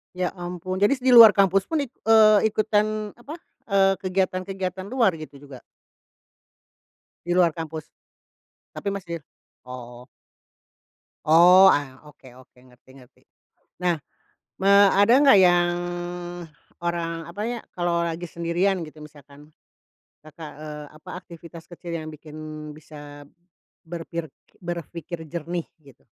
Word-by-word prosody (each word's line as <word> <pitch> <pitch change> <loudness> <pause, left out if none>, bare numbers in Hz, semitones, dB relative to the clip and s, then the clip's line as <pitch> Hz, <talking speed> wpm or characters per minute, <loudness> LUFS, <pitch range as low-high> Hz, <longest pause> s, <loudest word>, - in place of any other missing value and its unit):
Ya 180 -1 -1
ampun, 180 +1 -5
jadi 205 +7 +3
di 260 -1 -1
luar 230 -3 +10
kampus 195 -1 +2
pun 320 -3 -1
it 270 - -5 0.2
eee, 215 -1 +6
ikutan 215 0 0
apa, 275 +6 -10 0.3
eee, 195 -2 +2
kegiatan-kegiatan 185 0 -3
luar 235 -2 +2
gitu 145 -3 -11
juga? 140 -3 -12 1.7
Di 175 - -3
luar 175 -2 +4
kampus? 160 -1 -7 0.9
Tapi 200 - -3
masih? 170 -6 -6 0.4
Oh. 125 -1 -10 1.2
Oh, 180 +4 +7
ah, 135 -2 -3
oke 150 -3 -17
oke, 125 -1 -19
ngerti 125 +1 -24
ngerti. 125 - -21 0.6
Nah, 170 -4 +1 0.6
eee, 200 +1 +6
ada 205 +3 +4
nggak 275 -8 +6
yang 175 -1 +3 1.1
orang 165 -1 -3
apa, 175 +5 -9
ya, 240 - -4 0.2
kalau 170 -1 0
lagi 165 0 -5
sendirian 170 +1 -1
gitu 155 0 -13
misalkan, 145 0 -16 0.7
Kakak, 155 0 -11
eee, 150 0 -8
apa 155 - -14
aktivitas 170 -2 -13
kecil 175 0 -10
yang 155 - -8
bikin 155 0 -11 0.3
bisa 145 -1 -12 0.6
berpir 165 -2 -7 0.3
berpikir 170 -1 -6
jernih 170 +1 -5 0.2
gitu? 135 -3 -20
170 Hz, 120 wpm, -24 LUFS, 155-195 Hz, 1.7 s, luar